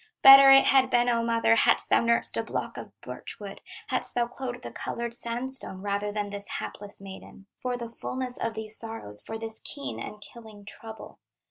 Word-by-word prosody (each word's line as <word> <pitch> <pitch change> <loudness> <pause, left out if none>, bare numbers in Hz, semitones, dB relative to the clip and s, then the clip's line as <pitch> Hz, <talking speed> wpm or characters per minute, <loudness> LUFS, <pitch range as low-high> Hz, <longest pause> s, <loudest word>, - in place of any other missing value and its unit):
Better 270 0 +10
it 270 0 +8
had 265 -1 +4
been, 240 0 +2
O 230 -1 +1
mother, 230 0 +2
Hadst - - +2
thou - - +5
nursed 235 0 +2
a - - +2
block - - -5
of - - -8
birch - - -6
wood, - - -9 0.3
Hadst - - +2
thou 240 -1 +2
clothed 245 0 -7
the - - -7
colored 235 0 -5
sandstone, 235 -4 -1
Rather 205 0 -2
than 205 -1 -4
this 200 0 -6
hapless 205 0 -7
maiden, 195 0 -12
For 250 -1 -3
the 235 -1 -6
fulness 250 +2 -4
of 230 -1 -3
these 220 0 -2
sorrows, 225 - -1
For 225 - -6
this 225 0 -6
keen 280 -1 -6
and 210 - -8
killing 215 -2 -13
trouble. 220 +1 -9
230 Hz, 195 wpm, -27 LUFS, 210-245 Hz, 0.3 s, Better